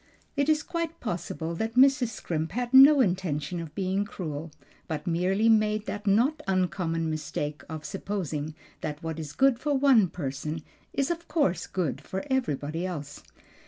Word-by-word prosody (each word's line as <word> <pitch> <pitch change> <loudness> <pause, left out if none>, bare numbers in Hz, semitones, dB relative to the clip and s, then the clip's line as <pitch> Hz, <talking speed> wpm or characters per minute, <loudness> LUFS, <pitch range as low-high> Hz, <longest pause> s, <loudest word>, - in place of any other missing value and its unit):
It 285 +1 +1
is 305 -1 +3
quite 335 -1 -3
possible 170 -5 -3
that 220 +6 -3
Mrs. 265 0 +5
Scrimp 165 -6 -3
had 245 +2 -2
no 275 +2 +9
intention 175 - -1
of 165 -2 -7
being 190 +1 0
cruel, 165 -6 -6 0.4
but 155 0 -4
merely 185 +5 +1
made 215 -1 +3
the 205 - -4
not 240 +10 +3
uncommon 180 -3 0
mistake 150 -1 -3
of 160 -1 -6
supposing 160 -7 -3 0.2
that 150 0 -5
what 160 -1 -4
is 150 -3 -5
good 265 +4 +3
for 295 -1 0
one 265 -7 +5
person 150 0 -4 0.3
is 275 +3 0
of 340 0 -4
course 190 - +1
good 175 -7 -2
for 190 +8 -5
everybody 165 - -1
else. 150 -6 -5
185 Hz, 160 wpm, -28 LUFS, 160-245 Hz, 0.4 s, no